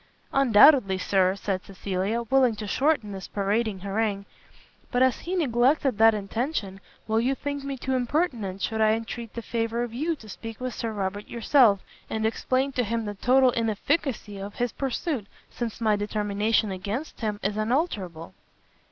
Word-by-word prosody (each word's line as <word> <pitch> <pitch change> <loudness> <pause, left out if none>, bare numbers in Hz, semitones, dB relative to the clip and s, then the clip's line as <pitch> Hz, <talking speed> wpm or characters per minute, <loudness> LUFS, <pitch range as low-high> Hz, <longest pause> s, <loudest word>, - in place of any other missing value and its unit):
"Undoubtedly, 250 -5 +6
Sir," 185 0 +2
said 195 -1 -3
Cecilia, 195 +4 -2
willing 255 -1 +3
to 210 0 -6
shorten 260 0 +1
this 190 -1 -7
parading 205 0 -1
harangue, 200 0 -1 0.7
"but 245 0 +3
as 260 -1 +2
he 360 +2 -4
neglected 265 - +2
that 225 0 +7
intention, 210 -1 -3 0.3
will 220 0 +2
you 260 +3 +1
think 285 0 -4
me 275 -1 -4
too 265 +1 -2
impertinent 245 - -1
should 220 -1 -1
I 215 0 +5
entreat 230 0 -5
the 235 - -5
favour 230 +1 -1
of 240 -2 -5
you 315 +7 -1
to 225 -7 -15
speak 225 +2 -8
with 255 -1 -3
Sir 225 +1 -3
Robert 205 0 -3
yourself, 235 -4 +4 0.3
and 220 0 -1
explain 255 +4 0
to 250 -2 0
him 230 +1 -2
the 205 - -3
total 255 +5 +4
inefficacy 230 -1 -1
of 200 +1 -7
his 245 -1 -1
pursuit, 270 - -3 0.2
since 235 -3 -4
my 220 -2 +3
determination 210 +1 0
against 205 +12 -5
him 210 -2 -2
is 205 +1 0
unalterable?" 215 - -2
225 Hz, 165 wpm, -26 LUFS, 205-255 Hz, 0.7 s, that